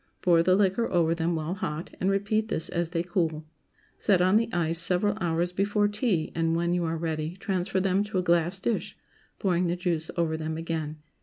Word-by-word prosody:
Pour 170 -2 +5
the 185 +2 +4
liquor 200 +3 +1
over 165 -2 +3
them 170 0 -1
while 160 +2 -2
hot, 165 -3 -5
and 190 - +2
repeat 205 +2 0
this 165 - -3
as 170 -1 -1
they 170 -1 -1
cool. 165 -3 -1 0.5
Set 195 -4 +3
on 185 +2 +3
the 230 +1 +2
ice 165 -1 +1
several 185 +4 +3
hours 175 +1 0
before 205 +2 +1
tea, 205 -6 0
and, 165 0 0
when 170 +1 0
you 175 -1 0
are 165 0 -1
ready, 160 0 -3
transfer 190 -1 -1
them 190 +1 +2
to 210 -2 -3
a 180 - +1
glass 175 +2 +1
dish, 220 +3 -2 0.4
pouring 180 -2 +1
the 170 - 0
juice 170 -3 -2
over 165 -2 +1
them 160 0 -4
again. 160 -2 -3
175 Hz, 205 wpm, -27 LUFS, 165-190 Hz, 0.5 s, Pour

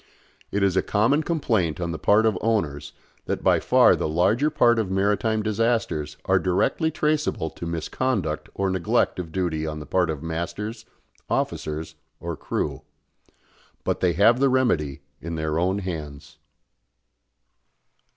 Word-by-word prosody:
It 100 0 0
is 95 -2 +2
a 95 - +4
common 120 +9 +2
complaint 110 - 0
on 85 -1 -2
the 80 - -5
part 110 +2 +4
of 110 -3 +2
owners 75 -11 -1 0.3
that - - -2
by - - +4
far - - +5
the - - -2
larger 105 - +2
part 120 -6 +3
of 105 -4 -1
maritime 105 +3 +1
disasters 110 -8 -1
are - - +3
directly 95 - +1
traceable 150 - -1
to 85 - -7
misconduct 85 +1 -2
or 95 -1 0
neglect 95 0 +1
of 85 -3 -5
duty 80 -3 -1
on 75 0 -4
the 75 - -8
part 90 0 +1
of 75 -2 -4
masters, 105 +7 -4 0.4
officers 80 +1 -2 0.3
or 85 -1 -4
crew; - - -3 1.0
but - - -1
they 90 -2 +2
have 110 +8 +4
the 135 0 +4
remedy 85 - +1 0.2
in 85 0 -5
their 80 0 -1
own 95 +3 +1
hands. 80 -7 -7
95 Hz, 150 wpm, -24 LUFS, 80-110 Hz, 1.0 s, far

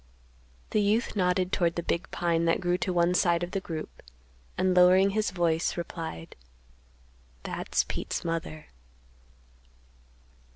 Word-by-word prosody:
The 215 - +2
youth 215 +4 +1
nodded 180 -1 +1
toward 170 -4 +1
the 170 - -3
big 170 +1 -2
pine 170 -1 0
that 165 - +2
grew 175 0 0
to 185 - -1
one 175 0 +2
side 175 -1 +2
of 175 - -4
the 195 - -1
group, 165 -4 -7 0.6
and, 185 0 +2
lowering 185 +2 +6
his 215 +1 0
voice, 170 -3 0
replied, 165 - -6 1.1
"That's - - -1
Pete's - - -4
mother." 165 -2 -4
175 Hz, 130 wpm, -28 LUFS, 170-185 Hz, 1.1 s, lowering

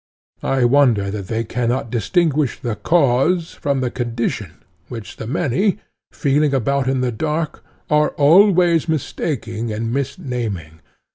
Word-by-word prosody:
I 135 -2 +1
wonder 120 -7 +3
that 100 -2 -5
they 115 +2 -1
cannot 120 +1 -2
distinguish 150 +2 +1
the 120 -3 -3
cause 160 +4 +2
from 140 -2 -1
the 125 -1 -1
condition, 115 - -3 0.4
which 115 -4 -8
the 110 - -6
many, 175 - 0 0.3
feeling 145 -1 +1
about 135 +2 0
in 130 -1 0
the 125 -1 0
dark, 155 +7 -3 0.2
are 150 0 +3
always 170 +1 +5
mistaking 120 -7 -3
and 115 +2 -3
misnaming. 125 - -4
130 Hz, 130 wpm, -20 LUFS, 115-150 Hz, 0.4 s, always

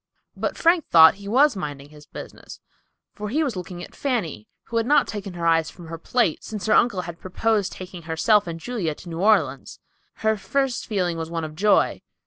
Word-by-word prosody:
But - - -3
Frank 335 0 +3
thought 160 -1 +8
he 200 - -9
was 265 +4 +4
minding 145 -6 -6
his 150 0 -16
business; - - -10 0.5
for 210 0 -6
he 305 +8 +1
was 270 -8 -2
looking 180 -1 -7
at - - -11
Fanny, 195 - -3 0.2
who 230 - -4
had 230 0 0
not 295 - +4
taken 200 -3 -6
her 170 -1 -4
eyes 165 -1 +3
from 170 -3 -12
her 165 0 -6
plate 230 -2 0
since 210 -4 -6
her 215 - +3
uncle 205 -6 +3
had 170 -2 -8
proposed 205 +2 0
taking 185 -1 -9
herself 170 +6 +2
and 165 -1 -5
Julia 180 -7 -3
to 175 - -12
New 165 0 -5
Orleans. 180 -10 +1 0.4
Her 220 0 0
first 255 +6 -1
feeling 180 -5 -1
was 160 0 -4
one 165 -1 -3
of 155 -1 -6
joy. 205 +5 +2
185 Hz, 205 wpm, -23 LUFS, 165-220 Hz, 0.5 s, thought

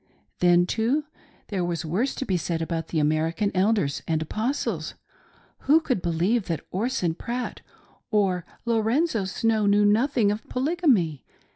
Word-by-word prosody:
Then, 175 0 +5
too, 235 +10 0 0.5
there 190 -4 -1
was 170 -2 -2
worse 205 - -1
to 265 - -3
be 190 - 0
said 170 -1 -1
about 165 -1 -3
the 165 - -3
American 160 +6 +1
Elders 190 -6 +1
and 160 -2 +1
Apos 240 - -1
tles. - - -3 0.7
Who 300 +4 +4
could 255 - -1
believe 180 +7 +1
that 165 -4 -3
Orson 195 -4 0
Pratt 240 +8 -5 0.5
or 195 -5 +1 0.2
Lorenzo 230 - +1
Snow 220 +2 +1
knew 205 +1 +4
nothing 220 0 +3
of 210 +2 -4
Polygamy 255 - +1
205 Hz, 145 wpm, -25 LUFS, 170-235 Hz, 0.7 s, Then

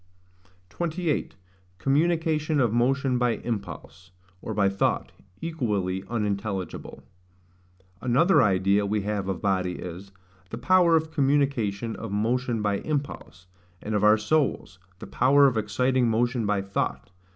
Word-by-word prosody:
28. 170 - -2 0.4
Communication 155 - +1
of 120 -4 +2
Motion 130 +1 +1
by 120 -1 +2
Impulse, 100 -5 -6 0.3
or - - -6
by 100 -2 +2
Thought, 100 0 0 0.3
equally 105 - -2
unintelligible. 100 -4 -4 1.0
Another 145 +7 +4
idea 100 -1 +2
we 105 +1 -1
have 100 -1 -3
of 95 0 -4
body 95 -2 0
is, 90 +3 -8 0.4
THE 115 - -6
POWER 175 +5 +4
OF 160 0 0
COMMUNICATION 135 -8 0
OF 115 - -7
MOTION 115 +2 -1
BY 100 -1 0
IMPULSE; 140 - -5 0.3
and 110 - -5
of 105 0 +1
our 105 +1 +6
souls, 110 - -1 0.2
THE - - -9
POWER 140 +3 +4
OF 130 -3 +3
EXCITING 120 +4 +1
MOTION 120 0 0
BY 100 -1 0
THOUGHT. 95 0 -3
115 Hz, 130 wpm, -26 LUFS, 100-140 Hz, 1.0 s, our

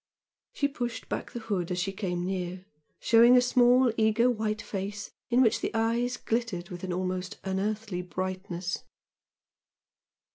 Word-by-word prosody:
She 285 - +1
pushed 240 -4 -4
back - - -3
the 240 - -6
hood 200 -6 -2
as 180 - -2
she 190 +2 -1
came 180 -3 -3
near, 185 0 -3 0.3
showing 235 +2 +6
a - - +8
small 245 0 +4
eager 225 +3 +3
white 215 -2 -1
face 200 +1 -5 0.2
in 250 +1 +5
which 225 - +2
the - - 0
eyes 235 +2 +1
glittered 225 -7 -2
with 175 0 -7
an 185 - -3
almost 185 0 -3
unearthly 200 0 -2
brightness. 185 0 -4
205 Hz, 145 wpm, -28 LUFS, 185-235 Hz, 0.3 s, a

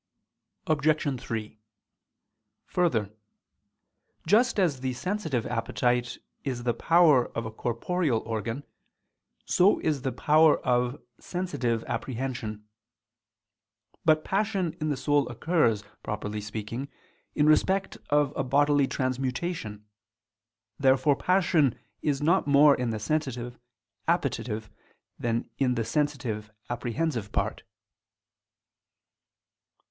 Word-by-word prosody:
Obj. 150 -3 +1
3: 110 -1 -5 1.1
Further, 115 - 0 1.1
just 230 +2 +3
as 165 -9 +2
the 130 0 -2
sensitive 160 - -2
appetite 120 +1 0 0.3
is 125 -3 -3
the 120 -1 +1
power 155 -2 +4
of 115 - -2
a 110 - -5
corporeal 120 +3 -1
organ, 115 +4 -3 0.8
so 190 +4 +4
is 150 -4 0
the 130 - -1
power 155 +3 +4
of 125 +2 +1 0.2
sensitive 130 -11 -2
apprehension. 120 -5 -4 1.4
But 155 -1 +4
passion 195 -4 0
in 155 - 0
the 145 - -1
soul 145 -1 +1
occurs, 120 - +1 0.2
properly 105 0 -4
speaking, 110 +5 -5 0.5
in 150 - +3
respect 190 +5 +2
of 145 -1 +2
a 135 - 0
bodily 145 +1 +3
transmutation. 130 -3 -3 0.9
Therefore 135 +1 +4
passion 170 - +2 0.2
is 145 -1 0
not 170 +1 +3
more 145 +1 +7
in 125 -1 -2
the 110 - -2
sensitive 125 -1 -3 0.5
appetitive 110 -2 -1 0.5
than 120 0 -1
in 125 -2 +2
the 115 -2 -1
sensitive 125 -8 -2 0.2
apprehensive 120 -1 -2
part. - - -1
135 Hz, 100 wpm, -27 LUFS, 115-155 Hz, 1.4 s, more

